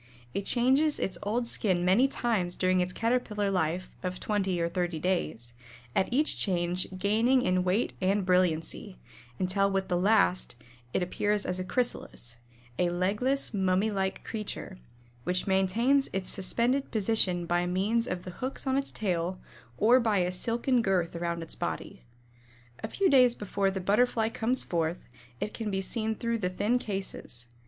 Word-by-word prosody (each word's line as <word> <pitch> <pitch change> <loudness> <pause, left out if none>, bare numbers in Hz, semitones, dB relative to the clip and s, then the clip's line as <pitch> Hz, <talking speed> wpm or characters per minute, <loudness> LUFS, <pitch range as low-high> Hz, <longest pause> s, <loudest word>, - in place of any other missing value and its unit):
It 200 - -3
changes 265 +5 +3
its 185 -2 -2
old 235 +4 -1
skin 185 -6 +1
many 205 +9 +5
times 220 -9 -1
during 185 0 +2
its 180 0 0
Caterpillar 220 -2 0
life 180 0 0
of 185 0 -4
twenty 195 -4 -1
or 170 - +1
thirty 175 -1 -2
days, 155 -9 -2 0.4
at 190 - +1
each 295 +5 +2
change 180 -1 0
gaining 225 +7 +3
in 185 0 +2
weight 185 +6 +1
and 195 +1 +1
brilliancy, 180 +1 0 0.4
until 195 +4 +1
with 195 0 -1
the 175 - +1
last 185 - +2 0.4
it 180 - 0
appears 205 +3 -1
as 180 0 -2
a - - -1
Chrysalis 185 - -3 0.4
"a 180 - +3
legless, 210 +11 0
mummy 190 +2 +1
like 190 -1 -2
creature," 210 - -5 0.4
which 180 +6 0
maintains 220 +9 +2
its 190 -1 -1
suspended 240 +8 0
position 195 -5 +1
by 175 +1 +1
means 210 +6 +1
of 180 -1 -3
the 180 - -7
hooks 260 +11 -4
on 265 0 +2
its 275 - -4
tail 180 -2 -2 0.4
or 240 +4 +5
by 220 -4 +1
a 180 -1 +1
silken 235 +6 +1
girth 185 -5 0
around 170 0 -2
its 165 - -6
body. - - -5 0.8
A - - -1
few 390 - +1
days 250 -5 +5
before 200 -1 -1
the 190 0 -3
Butterfly 220 +4 +2
comes 235 +3 +1
forth, 170 0 -2 0.3
it 210 - -3
can 225 -2 -4
be 195 -1 -1
seen 220 +3 -1
through 230 +1 -2
the 180 -3 0
thin 210 +7 +1
cases. 190 - -4
195 Hz, 165 wpm, -29 LUFS, 180-230 Hz, 0.8 s, many